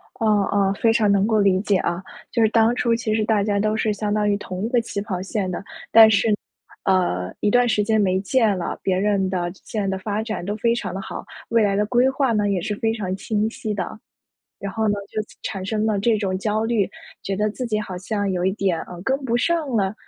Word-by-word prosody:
哦 225 Hz, -, -2 dB, 0.2 s
哦， 195 Hz, -1 st, +2 dB
非 225 Hz, -1 st, +4 dB
常 215 Hz, -3 st, +3 dB
能 200 Hz, 0 st, +3 dB
够 220 Hz, -2 st, +2 dB
理 190 Hz, -2 st, +3 dB
解 205 Hz, -2 st, +1 dB
啊， 175 Hz, 0 st, -1 dB, 0.3 s
就 230 Hz, -, +2 dB
是 220 Hz, -, +5 dB
当 225 Hz, +1 st, +3 dB
初 235 Hz, -1 st, +1 dB
其 230 Hz, -2 st, -1 dB
实 220 Hz, -, +1 dB
大 210 Hz, -2 st, +2 dB
家 200 Hz, -1 st, 0 dB
都 215 Hz, +1 st, +1 dB
是 215 Hz, -1 st, +1 dB
相 205 Hz, 0 st, -2 dB
当 210 Hz, -1 st, +1 dB
于 205 Hz, -, +2 dB
同 185 Hz, -1 st, -5 dB
一 -, -, 0 dB
个 245 Hz, -, +3 dB
起 225 Hz, -3 st, -4 dB
跑 190 Hz, -3 st, -4 dB
线 195 Hz, 0 st, -2 dB
的， 185 Hz, -, -4 dB, 0.3 s
但 220 Hz, -1 st, +9 dB
是， 210 Hz, +1 st, +3 dB, 0.5 s
呃， 95 Hz, -, +1 dB
一 205 Hz, -, +2 dB
段 245 Hz, +2 st, +4 dB
时 210 Hz, -2 st, +2 dB
间 220 Hz, 0 st, +2 dB
没 190 Hz, -1 st, +2 dB
见 215 Hz, -1 st, +2 dB
了， 175 Hz, -, -4 dB
别 185 Hz, -1 st, +1 dB
人 195 Hz, -2 st, +1 dB
的 175 Hz, -2 st, -1 dB
线 210 Hz, -3 st, -2 dB
的 190 Hz, -, -1 dB
发 205 Hz, +2 st, -2 dB
展 220 Hz, -5 st, -4 dB
都 205 Hz, +3 st, -3 dB
非 230 Hz, +1 st, +2 dB
常 210 Hz, -6 st, -4 dB
地 190 Hz, -, -4 dB
好， -, -, -7 dB, 0.3 s
未 230 Hz, -1 st, +4 dB
来 200 Hz, -1 st, +2 dB
的 210 Hz, -, +1 dB
规 250 Hz, +3 st, +3 dB
划 265 Hz, -3 st, +1 dB
呢 210 Hz, -1 st, +1 dB
也 190 Hz, -3 st, 0 dB
是 210 Hz, -, -2 dB
非 225 Hz, +1 st, 0 dB
常 195 Hz, -5 st, -3 dB
清 210 Hz, +2 st, -1 dB
晰 220 Hz, -1 st, -4 dB
的。 205 Hz, +2 st, -5 dB, 0.6 s
然 200 Hz, -1 st, -4 dB
后 220 Hz, -1 st, 0 dB
呢， 205 Hz, -, +2 dB, 0.2 s
就 215 Hz, -, -2 dB, 0.2 s
产 195 Hz, -3 st, -4 dB
生 215 Hz, +1 st, -1 dB
了 215 Hz, -2 st, +1 dB
这 220 Hz, +2 st, +2 dB
种 190 Hz, -3 st, -1 dB
焦 215 Hz, +2 st, -1 dB
虑， 225 Hz, -4 st, +1 dB, 0.3 s
觉 195 Hz, -, -3 dB
得 210 Hz, +2 st, +1 dB
自 250 Hz, +4 st, -4 dB
己 215 Hz, -2 st, -1 dB
好 190 Hz, -3 st, -5 dB
像 205 Hz, +2 st, -2 dB
有 180 Hz, -1 st, -1 dB
一 190 Hz, -, +2 dB
点， 195 Hz, -5 st, 0 dB
呃， 180 Hz, -, -10 dB
跟 265 Hz, +5 st, +1 dB
不 240 Hz, -2 st, +1 dB
上 330 Hz, +1 st, 0 dB
了， 205 Hz, -5 st, 0 dB
210 Hz, 265 characters per minute, -22 LUFS, 195-225 Hz, 0.6 s, 但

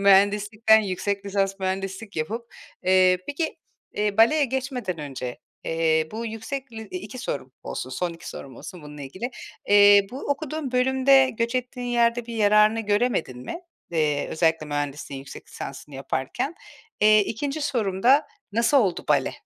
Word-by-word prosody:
mühendislikten 210 Hz, +3 st, +5 dB
yüksek 200 Hz, +1 st, -2 dB
lisans 195 Hz, -1 st, 0 dB
mühendislik 195 Hz, +1 st, -4 dB
yapıp. 225 Hz, +10 st, -4 dB, 0.3 s
Eee, 185 Hz, 0 st, +4 dB
peki, 320 Hz, +4 st, -3 dB, 0.4 s
eee, 210 Hz, -1 st, 0 dB
baleye 285 Hz, +7 st, +5 dB
geçmeden 255 Hz, -, -3 dB
önce, 130 Hz, -4 st, -6 dB, 0.3 s
eee, 160 Hz, -1 st, +1 dB
bu 230 Hz, +1 st, -4 dB
yüksek 240 Hz, +4 st, -6 dB
li 220 Hz, 0 st, -7 dB
2 205 Hz, +4 st, -7 dB
sorum 135 Hz, -, -4 dB
olsun, 130 Hz, -, -5 dB
son 175 Hz, +4 st, -2 dB
2 165 Hz, -, -10 dB
sorum 130 Hz, -3 st, -9 dB
olsun 180 Hz, -4 st, -9 dB
bununla 150 Hz, -1 st, -9 dB
ilgili. 185 Hz, -, -5 dB, 0.4 s
Eee, 205 Hz, -1 st, +7 dB
bu 260 Hz, -, -6 dB
okuduğun 290 Hz, -1 st, -3 dB
bölümde 265 Hz, +1 st, +4 dB
göç 230 Hz, +2 st, -2 dB
ettiğin 250 Hz, 0 st, -3 dB
yerde 235 Hz, -1 st, +2 dB
bir 235 Hz, -, -6 dB
yararını 210 Hz, +1 st, +4 dB
göremedin 205 Hz, -, 0 dB
mi? 230 Hz, -, -6 dB, 0.3 s
Eee, 150 Hz, -3 st, 0 dB
özellikle 160 Hz, -1 st, +1 dB
mühendisliğin 145 Hz, -1 st, -4 dB
yüksek 135 Hz, -, -11 dB
lisansını 140 Hz, +1 st, -8 dB
yaparken. 135 Hz, -, -3 dB, 0.5 s
Eee, 215 Hz, 0 st, +7 dB
2'nci 275 Hz, +9 st, -2 dB
sorum 205 Hz, -9 st, -1 dB
da 275 Hz, +5 st, +5 dB, 0.3 s
nasıl 235 Hz, +5 st, +3 dB
oldu 195 Hz, -8 st, 0 dB
bale? -, -, +2 dB
205 Hz, 150 wpm, -25 LUFS, 170-240 Hz, 0.5 s, Eee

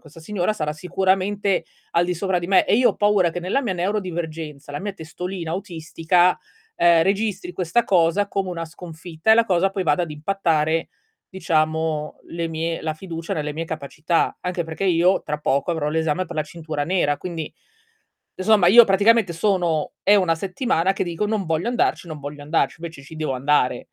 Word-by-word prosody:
questa 160 Hz, +1 st, -15 dB
signora 190 Hz, +3 st, -1 dB
sarà 150 Hz, -7 st, -2 dB
sicuramente 190 Hz, +4 st, 0 dB, 0.3 s
al 170 Hz, +1 st, +3 dB
di 180 Hz, 0 st, -1 dB
sopra 190 Hz, +1 st, 0 dB
di 175 Hz, -, -5 dB
me 195 Hz, -, +5 dB
e -, -, +3 dB
io 250 Hz, -, +5 dB
ho -, -, -11 dB
paura 205 Hz, -4 st, +3 dB
che 175 Hz, +1 st, -5 dB
nella 195 Hz, +11 st, 0 dB
mia 205 Hz, -6 st, -2 dB
neurodivergenza, 165 Hz, -6 st, -4 dB
la 145 Hz, -, -4 dB
mia 205 Hz, 0 st, -4 dB
testolina 175 Hz, +1 st, -6 dB
autistica, 175 Hz, -1 st, +1 dB, 0.4 s
ehm, 170 Hz, -1 st, +5 dB
registri 195 Hz, -2 st, -1 dB
questa 180 Hz, +6 st, 0 dB
cosa 180 Hz, +2 st, +2 dB
come 195 Hz, -2 st, -2 dB
una 165 Hz, -1 st, -4 dB
sconfitta 165 Hz, +2 st, -4 dB
e -, -, +8 dB
la 230 Hz, 0 st, +4 dB
cosa 190 Hz, -1 st, +2 dB
poi 195 Hz, -1 st, -2 dB
vada 150 Hz, +2 st, +2 dB
ad 165 Hz, -, -4 dB
impattare 160 Hz, -1 st, 0 dB, 0.4 s
diciamo 160 Hz, -3 st, -1 dB
le 170 Hz, 0 st, -3 dB
mie 165 Hz, +1 st, -3 dB
la 155 Hz, -1 st, -1 dB
fiducia 165 Hz, -1 st, -6 dB
nelle 150 Hz, -1 st, -3 dB
mie 160 Hz, +3 st, -4 dB
capacità. 160 Hz, +2 st, -1 dB
Anche 180 Hz, -1 st, -2 dB
perché 160 Hz, +4 st, -7 dB
io 180 Hz, +1 st, +3 dB
tra 150 Hz, 0 st, -3 dB
poco 140 Hz, +3 st, 0 dB
avrò 150 Hz, -2 st, -1 dB
l'esame 160 Hz, +3 st, 0 dB
per 175 Hz, -, -8 dB
la 155 Hz, -, +1 dB
cintura 155 Hz, -2 st, -5 dB
nera, 145 Hz, -4 st, +1 dB
quindi 165 Hz, -4 st, -5 dB, 0.8 s
e -, -, -6 dB
somma 215 Hz, -5 st, +5 dB
io 235 Hz, +5 st, +9 dB
praticamente 205 Hz, -1 st, +3 dB
sono 170 Hz, -4 st, 0 dB
è 205 Hz, -, +5 dB
1 180 Hz, -4 st, +3 dB
settimana 190 Hz, -, 0 dB
che -, -, -1 dB
dico: 175 Hz, +4 st, -2 dB
"Non 210 Hz, -3 st, -1 dB
voglio 165 Hz, +6 st, -1 dB
andarci, 240 Hz, -7 st, 0 dB
non 155 Hz, -2 st, -6 dB
voglio 145 Hz, +1 st, -7 dB
andarci", 155 Hz, +2 st, 0 dB
invece 160 Hz, -4 st, -8 dB
ci 140 Hz, +4 st, -12 dB
devo 155 Hz, -3 st, -2 dB
andare. 130 Hz, -2 st, +1 dB
170 Hz, 190 wpm, -22 LUFS, 160-190 Hz, 0.8 s, io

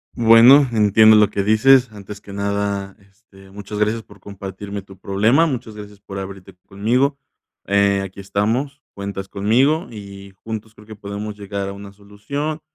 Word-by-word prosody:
Bueno, 120 Hz, +5 st, +7 dB
entiendo 110 Hz, 0 st, +5 dB
lo 105 Hz, -1 st, +5 dB
que 100 Hz, -, -2 dB
dices. 120 Hz, +3 st, +4 dB
Antes 105 Hz, -1 st, -10 dB
que 100 Hz, -, -12 dB
nada, 100 Hz, -1 st, -3 dB
este, 95 Hz, -1 st, -21 dB
muchas 105 Hz, +1 st, -8 dB
gracias 105 Hz, +2 st, 0 dB
por -, -, -18 dB
compartirme 100 Hz, 0 st, -8 dB
tu 95 Hz, 0 st, -16 dB
problema, 110 Hz, -, +2 dB
muchas 125 Hz, -7 st, -4 dB
gracias 105 Hz, -1 st, -11 dB
por 100 Hz, 0 st, -9 dB
abrirte 95 Hz, -1 st, -9 dB
conmigo, 125 Hz, +8 st, 0 dB, 0.5 s
eh, 100 Hz, 0 st, +2 dB
aquí 95 Hz, +1 st, -9 dB
estamos, 115 Hz, +9 st, -2 dB
cuentas 100 Hz, -1 st, -6 dB
conmigo 130 Hz, -, +1 dB
y 100 Hz, -2 st, -11 dB
juntos 110 Hz, 0 st, -7 dB
creo 105 Hz, 0 st, -18 dB
que 110 Hz, -, -10 dB
podemos 105 Hz, +1 st, -7 dB
llegar 100 Hz, -1 st, -5 dB
a -, -, -6 dB
una 100 Hz, 0 st, -11 dB
solución 120 Hz, +10 st, -6 dB
105 Hz, 160 wpm, -20 LUFS, 100-115 Hz, 0.5 s, Bueno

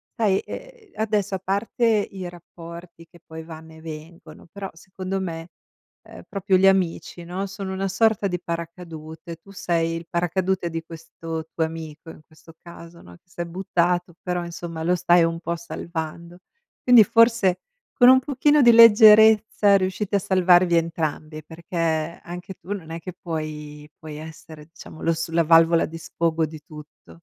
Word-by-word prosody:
sai, 200 Hz, -4 st, +1 dB
ehm, 485 Hz, -5 st, -11 dB
adesso 210 Hz, -3 st, -1 dB
a -, -, -4 dB
parte 200 Hz, +6 st, -2 dB, 0.3 s
i 190 Hz, -2 st, -7 dB
rapporti 170 Hz, 0 st, -12 dB
che 170 Hz, -, -19 dB
poi 160 Hz, 0 st, -9 dB
vanno 160 Hz, 0 st, -12 dB
e 160 Hz, -, -15 dB
vengono, 165 Hz, +3 st, -11 dB
però, 195 Hz, 0 st, -7 dB
secondo 185 Hz, +3 st, -6 dB
me, 165 Hz, -2 st, -6 dB, 0.5 s
ehm, -, -, -13 dB
proprio 195 Hz, -1 st, +1 dB
gli 190 Hz, +1 st, +4 dB
amici, 180 Hz, -2 st, 0 dB
no, 185 Hz, +3 st, -4 dB
sono 195 Hz, -1 st, -6 dB
una 195 Hz, +1 st, -2 dB
sorta 210 Hz, +1 st, +2 dB
di 180 Hz, -2 st, -3 dB
paracadute, 165 Hz, -1 st, -7 dB
tu 195 Hz, +4 st, -18 dB
sei 165 Hz, -3 st, -1 dB
il 165 Hz, 0 st, -10 dB
paracadute 180 Hz, +1 st, -1 dB
di 165 Hz, 0 st, -5 dB
questo 165 Hz, 0 st, -8 dB
tuo 165 Hz, -, 0 dB
amico 160 Hz, -1 st, -9 dB
in -, -, -15 dB
questo 160 Hz, +1 st, -18 dB
caso, 170 Hz, 0 st, -13 dB
no, 90 Hz, 0 st, -15 dB
che -, -, -41 dB
s'è 175 Hz, 0 st, -5 dB
buttato, 175 Hz, 0 st, -1 dB
però 180 Hz, -1 st, -3 dB
insomma 170 Hz, -1 st, -7 dB
lo 175 Hz, +2 st, +2 dB
stai 175 Hz, -1 st, +4 dB
un 165 Hz, 0 st, -1 dB
po' 170 Hz, 0 st, -3 dB
salvando. 170 Hz, 0 st, -7 dB, 0.4 s
Quindi 245 Hz, -3 st, +7 dB
forse, 230 Hz, -4 st, +3 dB, 0.3 s
con 245 Hz, -2 st, +6 dB
un 260 Hz, -, +7 dB
pochino 290 Hz, +2 st, +2 dB
di 240 Hz, -2 st, +7 dB
leggerezza, 220 Hz, -2 st, +7 dB
riuscite 190 Hz, +2 st, -1 dB
a -, -, 0 dB
salvarvi 180 Hz, -2 st, +3 dB
entrambi, 155 Hz, -2 st, -3 dB
perché 170 Hz, +2 st, -9 dB, 0.5 s
anche 180 Hz, +2 st, -8 dB
tu, 195 Hz, -, -7 dB
non 175 Hz, -6 st, -8 dB
è 165 Hz, -, -5 dB
che 180 Hz, +2 st, -8 dB
puoi 150 Hz, -3 st, -7 dB
puoi 155 Hz, -1 st, -9 dB
essere 155 Hz, 0 st, -11 dB
diciamo 165 Hz, -1 st, -13 dB
lo 165 Hz, -, +2 dB
s 165 Hz, 0 st, -4 dB
la 165 Hz, 0 st, +2 dB
valvola 165 Hz, +1 st, +5 dB
di 165 Hz, -, -9 dB
sfogo 165 Hz, 0 st, -1 dB
di 155 Hz, 0 st, -10 dB
tutto. 150 Hz, -1 st, -14 dB
170 Hz, 165 wpm, -23 LUFS, 165-190 Hz, 0.5 s, Quindi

